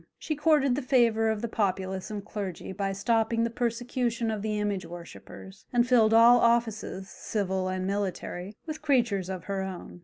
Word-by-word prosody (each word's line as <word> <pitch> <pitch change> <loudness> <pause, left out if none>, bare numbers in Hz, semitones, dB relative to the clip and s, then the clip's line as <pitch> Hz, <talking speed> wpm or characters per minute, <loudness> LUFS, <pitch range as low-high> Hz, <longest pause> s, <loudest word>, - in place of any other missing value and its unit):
She 310 - -3
courted 295 -3 +3
the 280 - -1
favour 235 -4 +3
of 220 0 -2
the - - 0
populace 190 -2 -2
and 205 -2 -5
clergy 195 -5 -5
by 195 +1 -2
stopping 225 +3 +1
the 230 - -1
persecution 235 -1 -1
of 215 -2 -3
the 210 0 -2
image 205 -2 -1
worshippers, 175 +3 -11
and 240 0 +2
filled 230 -4 +5
all 230 +2 +7
offices, 225 -5 +1
civil 190 -2 -2
and 185 0 -2
military, 195 -1 -3
with 310 -1 -6
creatures 235 - +1
of 185 -3 -5
her 195 -1 -3
own. 185 -2 -7
215 Hz, 175 wpm, -28 LUFS, 190-235 Hz, -, all